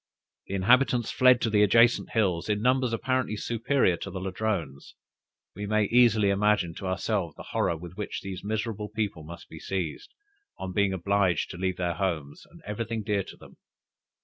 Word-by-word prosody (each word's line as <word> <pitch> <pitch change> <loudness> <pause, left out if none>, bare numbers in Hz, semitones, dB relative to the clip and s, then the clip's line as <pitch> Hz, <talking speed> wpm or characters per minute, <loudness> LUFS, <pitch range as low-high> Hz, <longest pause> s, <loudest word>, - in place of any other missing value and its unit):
The 100 - -3
inhabitants 120 +4 +3
fled 125 -1 +5
to 115 - 0
the 105 -1 +4
adjacent 115 +4 +4
hills, 95 -5 +1
in 105 -1 +1
numbers 125 +2 +2
apparently 125 -1 -1
superior 115 -4 +1
to - - -6
the 95 - -5
Ladrones. 95 -7 -3 0.6
We 105 0 -5
may 110 +1 +2
easily 110 -3 +4
imagine 100 -4 +2
to 95 - -5
ourselves 95 -3 -1
the - - -11
horror 85 - +1
with 90 +2 -11
which 105 - -4
these 95 -2 -7
miserable 105 0 -3
people 105 -7 -3
must 85 +3 -10
be 80 - -11
seized, 90 -5 -4 0.4
on 95 -1 -5
being 100 0 +2
obliged 95 -2 +1
to - - -8
leave 95 0 -2
their 90 -1 -1
homes, 80 -7 -3
and - - -17
everything 110 +1 -3
dear 105 -1 0
to - - -11
them. - - -16
100 Hz, 175 wpm, -27 LUFS, 90-110 Hz, 0.6 s, fled